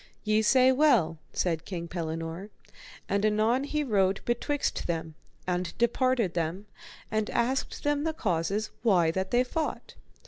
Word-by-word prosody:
Ye 215 0 +2
say 255 +4 +5
well, 250 - +3
said 165 -3 -1
King 170 -3 -5
Pellinore. 165 +2 -4 0.6
And 200 +1 0
anon 215 +5 +2
he 300 +1 -1
rode 195 -6 +2
betwixt 285 +4 -1
them, 165 -2 -3 0.3
and 180 0 -2
departed 235 -4 +1
them, 170 +4 -2 0.5
and 215 0 0
asked 260 +3 -1
them 290 0 +1
the 320 - 0
causes 195 - -1
why 180 -8 +3
that 190 +2 -2
they 245 +1 +3
fought? 310 +5 -4
210 Hz, 140 wpm, -28 LUFS, 175-255 Hz, 0.6 s, say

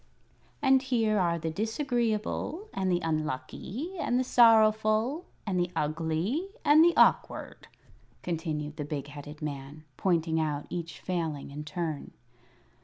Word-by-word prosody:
"And 265 -1 +5
here 225 -5 +1
are 170 -2 +2
the 165 -1 -3
Disagreeable, 235 - -1
and 190 -1 0
the 175 0 +1
Unlucky, 165 - -3
and 245 -5 +1
the - - +2
Sorrowful, 225 +4 +4 0.2
and 190 -4 0
the 175 0 +1
Ugly, 160 - -1 0.2
and 300 +2 +7
the 345 0 +4
Awkward," - - +2 0.6
continued 155 -3 -3
the 150 - -3
big 145 -1 -5
headed 150 +1 -9
man, 145 +1 -6
pointing 165 -3 +1
out 150 -2 -1
each 165 -3 -5
Failing 160 -6 -3
in 150 +2 -7
turn. 160 -2 -4
175 Hz, 130 wpm, -29 LUFS, 155-230 Hz, 0.6 s, and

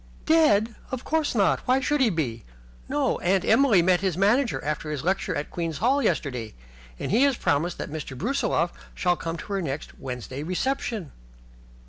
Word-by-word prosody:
"Dead? 240 -9 +4 0.2
Of 260 -1 -4
course 315 -4 0
not. 200 -4 +3
Why 255 +1 +4
should 290 +1 0
he 250 - +5
be? 130 - -2 0.5
No, - - 0
Aunt 185 +1 +1
Emily 240 -11 +5
met 180 0 +3
his 190 -4 0
manager 225 +6 +2
after 150 +1 -2
his 150 -2 -3
lecture 190 +3 0
at 145 - -4
Queen's 165 -3 -3
Hall 265 +5 +2
yesterday, 125 - -1 0.4
and - - -4
he 225 +5 +4
has 280 -3 +3
promised 155 +5 0
that - - -5
Mr. 150 -4 -6
Brusiloff 185 - 0 0.2
shall 180 -1 +2
come 165 0 -4
to 200 - -7
her 195 - 0
next 145 -3 -5
Wednesday 125 0 -6
reception." 195 - -2
185 Hz, 175 wpm, -25 LUFS, 150-245 Hz, 0.5 s, he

